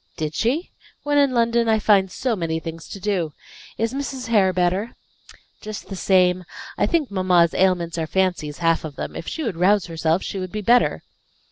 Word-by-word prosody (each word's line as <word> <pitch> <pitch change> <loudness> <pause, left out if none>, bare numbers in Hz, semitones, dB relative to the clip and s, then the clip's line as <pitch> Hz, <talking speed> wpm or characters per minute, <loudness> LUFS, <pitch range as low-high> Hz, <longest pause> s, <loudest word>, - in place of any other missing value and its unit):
"Did 155 -1 -3
she? 265 - -1 0.3
When 290 0 +2
in 280 -1 +4
London 235 -1 +2
I 220 - +4
find 200 -3 +3
so 255 +1 -1
many 165 -3 -2
things 165 0 -8
to 200 - -7
do! 185 -6 -1 0.4
Is 225 +2 -1
Mrs. 270 -3 -4
Hare 200 -5 +4
better?" 185 +5 0 0.7
"Just 215 -1 -7
the 195 - -5
same. 180 -1 +3 0.3
I - - +1
think 315 - 0
mamma's 180 -3 +3
ailments 175 -3 +1
are 160 - -2
fancies, 175 -5 -1
half 165 -1 +1
of 155 -3 -7
them; - - -6
if - - -7
she 320 - -4
would 215 - -3
rouse 190 +1 +3
herself 165 +1 0
she 195 - -4
would 185 -1 -5
be 210 - -4
better. 240 +4 +3
190 Hz, 195 wpm, -22 LUFS, 170-230 Hz, 0.7 s, in